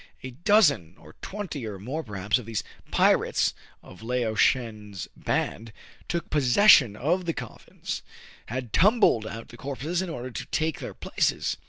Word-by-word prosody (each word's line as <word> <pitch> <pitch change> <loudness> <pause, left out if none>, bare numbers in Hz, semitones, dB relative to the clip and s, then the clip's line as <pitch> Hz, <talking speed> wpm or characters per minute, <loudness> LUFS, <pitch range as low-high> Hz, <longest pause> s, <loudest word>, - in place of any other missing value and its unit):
A 130 - -6
dozen 150 - +3
or - - -16
twenty, 190 - -5
or 105 -2 -6
more 130 +11 -4
perhaps, 105 +1 -1
of 115 - -10
these 115 -3 -2 0.3
pirates - - +3 0.3
of 95 - -14
Lao 120 -1 -1
Shen's 110 -5 0
band, 110 +1 -2 0.4
taking 170 -1 -2
possession 140 - +6
of 175 - 0
the 165 - -1
coffins, - - -7 0.5
had 125 -1 -5
tumbled 195 - +4
out 115 +1 -8
the 120 - -12
corpses, 145 +7 -3
in 190 - -4
order 130 -5 -6
to - - -5
take 160 -1 -1
their - - -7
places. - - -1
125 Hz, 155 wpm, -26 LUFS, 110-165 Hz, 0.5 s, possession